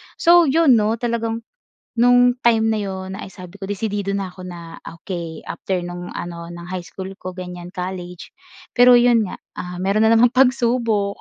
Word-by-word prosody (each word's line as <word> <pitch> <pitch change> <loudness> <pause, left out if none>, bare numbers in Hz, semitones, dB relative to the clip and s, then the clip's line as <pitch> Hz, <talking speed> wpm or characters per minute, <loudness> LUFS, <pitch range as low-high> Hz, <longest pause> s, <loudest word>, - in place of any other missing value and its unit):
So 340 -1 +5
'yon 275 -4 +5
'no, 215 +1 +1
talagang, 230 -1 -2 0.6
no'ng 245 0 +5
time 225 -2 +3
na 220 - 0
'yon 190 -1 -5
ay - - -7
sabi 185 0 -12
ko, 195 - -6
"Desidido 205 -1 -2
na 195 -2 -3
ako," 185 0 -10
na 170 -2 -9 0.2
okey 170 -4 -6
after 185 -2 -3
no'ng 175 0 -7
ano 170 -1 -6
ng 170 0 -9
high 185 -1 -3
school 190 0 -7
ko 185 0 -7
ganiyan 180 -1 -7
college, 180 -1 -6 0.4
pero 245 0 +7
'yon 240 -3 +4
nga, - - -7 0.2
ah, 180 0 -6
mayro'n 200 +2 +1
na 225 - +5
namang 235 +1 +5
pagsubok. 235 -5 +1
200 Hz, 175 wpm, -20 LUFS, 180-235 Hz, 0.6 s, pero